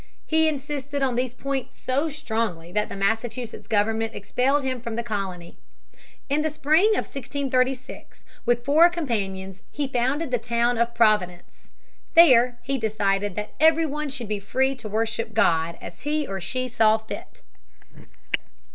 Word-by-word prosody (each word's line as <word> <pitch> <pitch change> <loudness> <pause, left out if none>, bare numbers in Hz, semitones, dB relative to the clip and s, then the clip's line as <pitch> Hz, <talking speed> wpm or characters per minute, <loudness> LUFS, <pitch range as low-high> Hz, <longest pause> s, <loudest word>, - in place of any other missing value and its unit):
He 320 0 +3
insisted 285 -1 -3
on 260 -2 +1
these 250 0 -2
points 275 0 -4
so 275 +5 0
strongly 220 - -3
that 210 +2 0
the - - -6
Massachusetts 225 +2 -2
government 220 +1 0
expelled 260 +7 +1
him 255 -2 -2
from 230 -2 -5
the 235 - -2
colony. 195 -6 -5 0.7
In 285 +2 +1
the 315 - 0
spring 310 +7 +3
of - - 0
1636; 260 -1 -3 0.2
with 240 0 +1
four 315 +5 +6
companions 195 - -3
he 290 -1 -3
founded 265 +4 -1
the 245 - +1
town 235 +1 0
of 235 0 0
Providence. 210 -6 +1 0.5
There 250 -7 +7
he 270 +1 -1
decided 205 -3 0
that 210 0 -5
every 320 +1 +5
one 300 0 -3
should 260 -4 -6
be 210 0 -2
free 260 +7 +1
to 225 -3 -7
worship 220 0 -2
God 170 -6 +2
as 170 - -10
he 300 0 -1
or 195 -5 -5
she 255 +7 -2
saw 220 -3 +4
fit. 220 0 -9
240 Hz, 155 wpm, -24 LUFS, 215-275 Hz, 0.7 s, There